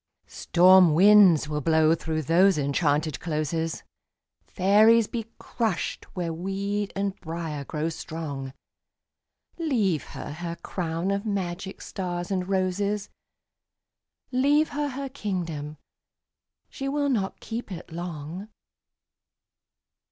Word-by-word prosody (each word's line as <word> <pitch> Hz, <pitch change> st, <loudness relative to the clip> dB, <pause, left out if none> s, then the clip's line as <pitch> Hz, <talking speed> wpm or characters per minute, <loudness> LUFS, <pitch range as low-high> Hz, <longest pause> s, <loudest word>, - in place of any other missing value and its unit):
Storm 180 Hz, -2 st, +5 dB
winds 190 Hz, -4 st, +6 dB
will 150 Hz, 0 st, -2 dB
blow 160 Hz, +1 st, +4 dB
through 160 Hz, -1 st, -2 dB
those 175 Hz, +4 st, +4 dB
enchanted 145 Hz, +1 st, 0 dB
closes, 160 Hz, 0 st, -2 dB, 0.6 s
Fairies 215 Hz, +4 st, +5 dB
be 230 Hz, 0 st, -5 dB
crushed 225 Hz, -7 st, -2 dB
where 170 Hz, -3 st, -2 dB
weed 195 Hz, +4 st, -3 dB
and 195 Hz, 0 st, -1 dB
briar 160 Hz, -3 st, -5 dB
grow 155 Hz, +2 st, -3 dB
strong... 150 Hz, -5 st, -5 dB, 1.1 s
Leave 220 Hz, -, +1 dB
her -, -, -6 dB
her 170 Hz, +1 st, -5 dB
crown 170 Hz, +1 st, -2 dB
of 200 Hz, 0 st, -1 dB
magic 190 Hz, -3 st, -4 dB
stars 175 Hz, -1 st, -4 dB
and 185 Hz, -1 st, -1 dB
roses, 195 Hz, +2 st, -1 dB, 1.2 s
Leave 285 Hz, +4 st, +3 dB
her 295 Hz, 0 st, -2 dB
her 275 Hz, +1 st, -5 dB
kingdom—she 180 Hz, -, -7 dB
will 285 Hz, 0 st, 0 dB
not 205 Hz, -7 st, -1 dB
keep 225 Hz, -2 st, -6 dB
it 175 Hz, -2 st, -8 dB
long! 170 Hz, +3 st, -6 dB
180 Hz, 105 wpm, -26 LUFS, 160-205 Hz, 1.2 s, winds